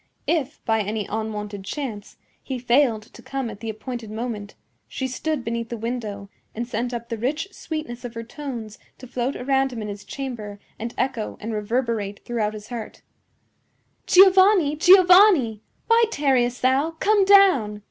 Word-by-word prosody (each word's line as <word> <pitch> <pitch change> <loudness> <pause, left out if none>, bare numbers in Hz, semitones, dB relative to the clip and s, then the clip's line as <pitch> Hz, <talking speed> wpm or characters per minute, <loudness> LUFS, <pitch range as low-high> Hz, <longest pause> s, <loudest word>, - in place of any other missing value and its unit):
If, 305 -3 -2
by 225 -2 +2
any 210 0 -3
unwonted 210 -2 -4
chance, 220 -3 -6 0.2
he 265 - -5
failed 240 -2 +2
to - - -16
come 270 -4 -4
at 200 - -11
the 225 - -5
appointed 225 +1 -6
moment, 215 -2 -5 0.3
she 265 - -4
stood 275 +1 -3
beneath 230 0 -3
the 235 - -4
window 215 -3 -5 0.3
and 235 +2 -3
sent 240 +1 -2
up 235 -1 -6
the 230 - -4
rich 300 - -2
sweetness 310 -9 -6
of 240 -1 -7
her 230 - -5
tones 235 -5 -7 0.2
to 260 - -11
float 255 +1 -3
around 270 +1 +1
him 240 - -6
in 210 -1 -5
his 205 0 -7
chamber 215 -4 -6 0.2
and 230 +2 -5
echo 255 -5 -2
and 225 +1 -5
reverberate 215 -2 -2
throughout 215 -3 -2
his 210 0 -10
heart: 235 -3 -7 1.0
"Giovanni! 375 -4 +6
Giovanni! 360 - +6 0.2
Why 460 0 +5
tarriest 260 - +1
thou? 275 +6 +2
Come 415 -1 +3
down!" 375 - +5
240 Hz, 160 wpm, -23 LUFS, 220-280 Hz, 1.0 s, Giovanni